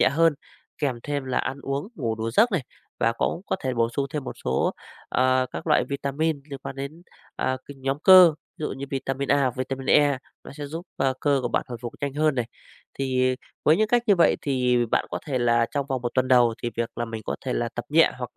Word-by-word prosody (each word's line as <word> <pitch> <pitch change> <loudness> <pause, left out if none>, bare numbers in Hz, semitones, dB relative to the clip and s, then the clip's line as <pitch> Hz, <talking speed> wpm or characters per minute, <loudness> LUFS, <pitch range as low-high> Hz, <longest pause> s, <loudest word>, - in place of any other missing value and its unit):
nhẹ - - +6
hơn, 165 +3 +3 0.4
kèm 140 -5 -1
thêm 145 -2 -3
là 130 - 0
ăn 135 +1 -3
uống, 140 +7 -3
ngủ 115 - -2
đủ 110 +1 -3
giấc 225 - +4
này 175 -8 +1 0.4
và 115 - +3
cũng 140 - -1
có - - 0
thể 130 -1 0
bổ 115 0 +2
sung 135 +4 -2
thêm 150 -3 -4
một - - -5
số, 65 +1 +1 0.4
ờ, 130 0 +2
các - - -7
loại - - +3
vitamin 140 +2 -1
liên 140 - -5
quan 135 - -6
đến, 140 +5 -6 0.3
ờ, 130 - 0
các 140 - -10
nhóm 135 +1 -2
cơ, 180 -1 +8 0.2
ví 155 - -4
dụ - - -2
như 135 +1 -5
vitamin 135 0 -2
A, 140 - +5
hoặc 130 -3 0
vitamin 130 +1 -4
E, 145 -3 +4 0.3
nó - - -10
sẽ 145 0 -6
giúp 165 +5 -7 0.3
cơ 145 -2 +2
của 120 - -1
bạn - - 0
hồi 120 - -6
phục 120 - -5
nhanh 140 -1 -2
hơn 155 0 +2
này. 125 -2 0 0.5
Thì 130 -1 +1 0.3
với 155 - +5
những 215 +1 +2
cách 240 +1 +3
như 205 - +6
vậy 170 - +4
thì 125 -3 +1
bạn - - +1
có - - -2
thể 135 -4 -1
là 120 -1 +3
trong 140 -1 -2
vòng 130 -3 -2
1 120 - -1
tuần 130 0 +2
đầu 120 -3 +5
thì 120 - -1
việc 115 0 -1
là 120 - 0
mình 115 -1 -6
có - - -3
thể - - -1
là - - -1
tập - - -4
nhẹ, - - +5
hoặc - - -7
135 Hz, 250 wpm, -25 LUFS, 125-145 Hz, 0.5 s, cơ